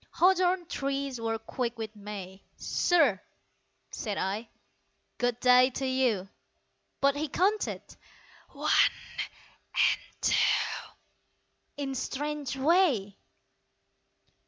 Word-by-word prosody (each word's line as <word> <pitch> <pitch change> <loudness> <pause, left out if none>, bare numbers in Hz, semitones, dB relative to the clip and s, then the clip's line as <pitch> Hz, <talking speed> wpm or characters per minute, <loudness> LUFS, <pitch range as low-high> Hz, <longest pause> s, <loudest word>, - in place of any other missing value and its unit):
Hawthorn 365 0 +3
trees 275 -5 -3
were 225 0 -1
quick 235 +2 -4
with 220 -1 -6
May 200 -2 -8 0.2
"Sir," 290 - +2 0.7
said 210 -3 -4
I, 205 +4 -2 0.7
"Good 245 -1 0
day 250 +1 +6
to 270 - -2
you"! 255 -7 +1 0.7
But 280 0 +4
he 305 +2 -2
counted. 395 +8 0 0.7
"One - - -2 0.2
and - - -2 0.2
two" - - +1 0.9
In 275 -2 -3
strange 285 0 -3
way. 270 - +2
260 Hz, 90 wpm, -29 LUFS, 220-295 Hz, 0.9 s, day